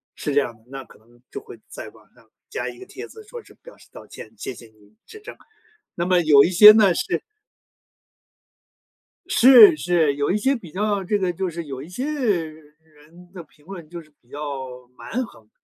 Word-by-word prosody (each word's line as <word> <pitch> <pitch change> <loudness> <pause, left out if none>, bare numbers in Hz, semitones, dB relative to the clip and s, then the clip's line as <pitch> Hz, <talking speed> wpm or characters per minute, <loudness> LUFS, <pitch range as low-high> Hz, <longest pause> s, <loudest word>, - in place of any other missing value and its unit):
是 145 - -5
这 145 - +3
样 120 -4 -6
的， 110 - -29
那 135 +1 -9
可 - - -20
能 120 +2 -26
就 - - -7
会 420 - -14
在 - - -10
网 - - -24
上 - - -26 0.2
加 - - -5
一 - - -12
个 385 - -11
帖 - - -10
子 440 - -15
说 475 +1 -11
是 - - -19
表 - - -17
示 - - -21
道 - - -13
歉， - - -13
谢 205 - -7
谢 120 - -15
您 110 -1 -27
指 430 - -14
正。 420 - -12 0.6
那 170 - -3
么 180 0 +2
有 145 -4 +5
一 - - +1
些 210 +4 +9
呢， 210 -4 +4
是 250 - -3 2.1
是 270 - +7
是， 170 - 0
有 145 0 -2
一 190 - +1
些 270 +5 0
比 175 -9 -13
较 205 0 -2
这 205 +3 -1
个 185 -2 -2
就 185 +2 -4
是 170 0 -7
有 135 -3 -8
一 150 - -12
些 215 +9 -6
人 160 - -6
的 185 -3 -10
评 150 -1 -29
论 175 -5 -11
就 170 +1 -9
是 155 -2 -20
比 120 - -33
较 145 - -9 0.6
蛮 255 +2 -5
横 110 - -20
175 Hz, 225 characters per minute, -21 LUFS, 145-210 Hz, 2.1 s, 些